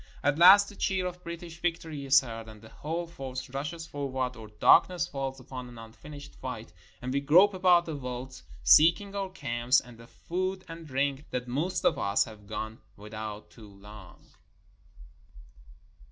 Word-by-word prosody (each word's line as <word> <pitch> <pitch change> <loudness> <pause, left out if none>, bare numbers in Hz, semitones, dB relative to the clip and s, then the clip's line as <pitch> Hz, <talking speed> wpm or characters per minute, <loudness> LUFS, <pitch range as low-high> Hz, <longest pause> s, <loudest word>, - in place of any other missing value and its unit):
At 145 +2 +1
last 200 +4 +9
the 205 - -11
cheer 190 -2 -1
of 180 0 -6
British 170 -1 -8
victory 160 -4 -3
is 135 +1 +7
heard, 115 -3 -8
and 110 -1 -12
the 110 +1 -15
whole 165 +3 -4
force 130 -5 -7
rushes 150 +5 -5
forward, 130 -4 -3
or 110 -1 -10
darkness 170 +10 +4
falls 135 -5 -5
upon 130 -1 -8
an 120 - -13
unfinished 115 +6 -11
fight, - - -7 0.3
and 130 +1 -3
we 140 - +1
grope 180 +8 +5
about 180 -2 +4
the 160 - -5
veldt, 130 -1 -6 0.2
seeking 170 +6 +5
our 195 -1 -3
camps, 120 -7 +1
and 120 -2 -14
the 115 - -13
food 185 +6 -4
and 165 0 -9
drink 140 +1 -2
that 125 0 -4
most 160 +9 -2
of - - +3
us 100 0 +2
have 105 -3 -13
gone 110 +1 -5 0.2
without 105 0 -8
too 110 -3 -14
long. 100 -1 -14
140 Hz, 170 wpm, -28 LUFS, 120-170 Hz, 0.3 s, last